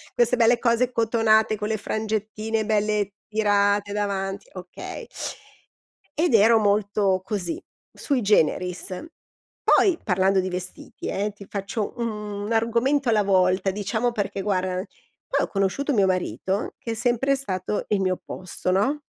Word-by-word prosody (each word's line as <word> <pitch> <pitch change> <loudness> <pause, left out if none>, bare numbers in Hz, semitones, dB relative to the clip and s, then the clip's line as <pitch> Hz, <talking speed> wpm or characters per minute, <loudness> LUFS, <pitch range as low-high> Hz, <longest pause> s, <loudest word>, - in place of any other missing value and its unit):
queste 240 +1 +3
belle 235 +1 +4
cose 240 +1 +2
cotonate, 220 -2 +3
con 210 0 -3
le 220 - 0
frangettine 215 +1 -2
belle 210 -2 +1 0.2
tirate 205 -1 +2
davanti, 200 - -2
okay. - - -8 1.1
Ed 330 -4 +2
ero 225 +1 +6
molto 205 -2 +2
così, 190 -5 -3 0.3
sui 275 -4 -1
generis. 180 - +1 0.6
Poi, 370 -5 +4
parlando 190 0 +2
di 185 0 -1
vestiti, 180 0 -5
eh, 205 +2 -1
ti 200 -1 -12
faccio 200 +1 -3
un 210 -2 -4
argomento 235 +4 +2
alla 210 -2 +3
volta, 185 0 +2
diciamo, 220 +4 -1
perché 200 -3 -3
guarda 185 -2 -1 0.5
poi - - +1
ho - - -12
conosciuto 200 +9 0
mio 200 -4 +4
marito, 185 - -1
che 230 - -5
è - - -1
sempre 245 +4 +1
stato 200 -6 -2
il 205 - +2
mio 185 -1 +2
opposto, 185 0 -4
no. 265 +11 +1
210 Hz, 140 wpm, -24 LUFS, 195-225 Hz, 1.1 s, ero